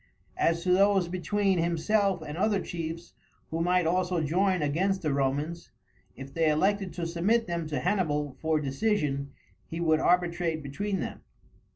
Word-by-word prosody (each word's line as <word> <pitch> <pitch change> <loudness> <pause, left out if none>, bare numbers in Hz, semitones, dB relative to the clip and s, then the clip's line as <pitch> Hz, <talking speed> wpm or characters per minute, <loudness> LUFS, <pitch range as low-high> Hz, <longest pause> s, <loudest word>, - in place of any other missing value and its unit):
As 170 0 +2
to 180 - +1
those 195 -1 +4
between 190 +2 0
himself 175 +2 +1
and 150 -1 -6
other 200 +3 +1
chiefs, 165 -1 -6 0.4
who 165 +1 -1
might 180 0 +2
also 180 +1 +1
join 180 +2 +1
against 185 +6 0
the 150 -3 +1
Romans, 140 +5 -1 0.5
if 135 0 -10
they 165 -1 +2
elected 195 +5 +1
to 175 - -3
submit 190 +8 +1
them 170 -2 -3
to 150 -1 -2
Hannibal 150 -7 0
for 160 -1 +1
decision 140 -2 -1 0.4
he 165 - -5
would 160 -2 +3
arbitrate 170 -2 +1
between 190 +9 -3
them. - - -5
170 Hz, 155 wpm, -28 LUFS, 155-190 Hz, 0.5 s, those